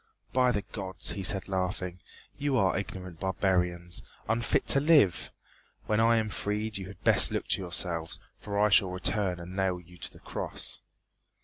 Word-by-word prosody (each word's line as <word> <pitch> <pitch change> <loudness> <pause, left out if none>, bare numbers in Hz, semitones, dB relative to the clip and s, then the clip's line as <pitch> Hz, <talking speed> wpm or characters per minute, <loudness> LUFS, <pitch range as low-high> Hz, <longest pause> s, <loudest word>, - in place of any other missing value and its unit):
"By 125 -1 +4
the 105 -4 -1
Gods," 95 -4 -5
he 100 - -4
said 95 +1 0
laughing, 90 -1 -2 0.4
"you 140 -2 0
are 95 -4 +3
ignorant 95 -3 -5
barbarians, 90 -2 0 0.3
unfit 115 +2 +1
to 140 - +9
live. 145 - +4 0.5
When 105 0 +1
I 115 +1 +5
am 110 -1 0
freed 105 +1 -2
you 95 - -6
had 95 -1 -13
best - - +6
look - - -2
to - - +1
yourselves, 85 -2 -2 0.2
for 100 -1 -4
I 105 +1 +4
shall 100 -2 +5
return 90 0 0
and 90 +2 -8
nail 95 -2 0
you 90 0 -17
to - - -6
the - - -16
cross." - - -5
95 Hz, 175 wpm, -29 LUFS, 90-105 Hz, 0.5 s, to